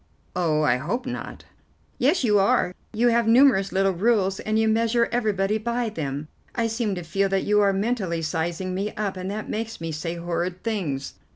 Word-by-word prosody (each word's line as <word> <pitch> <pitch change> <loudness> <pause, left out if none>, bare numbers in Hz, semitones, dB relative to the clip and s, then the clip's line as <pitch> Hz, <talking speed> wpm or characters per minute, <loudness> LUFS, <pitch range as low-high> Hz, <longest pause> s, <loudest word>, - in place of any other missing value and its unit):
"Oh, 160 -4 +1
I 125 -4 +3
hope 200 - -3
not." 250 -1 -6 0.6
"Yes, 280 +5 +3
you 210 -4 +4
are. 195 -2 +2 0.2
You 235 +2 +2
have 235 -1 +2
numerous 230 -5 +5
little 195 +1 +2
rules, 195 0 +1
and 215 0 -1
you 220 0 +3
measure 230 +1 +2
everybody 215 -3 +1
by 235 +1 -1
them. 145 -6 -4 0.3
I 230 - +1
seem 225 -3 -1
to 175 - -5
feel 195 +4 0
that 195 0 +1
you 210 0 +3
are 200 -1 +4
mentally 195 -5 -1
sizing 170 +3 -2
me 200 +3 -3
up, 205 -2 -2
and 185 0 -5
that 210 +2 -4
makes 225 +1 -4
me 165 0 -4
say 165 +2 -4
horrid 175 +1 -3
things." 175 -12 -2
195 Hz, 190 wpm, -24 LUFS, 175-225 Hz, 0.6 s, numerous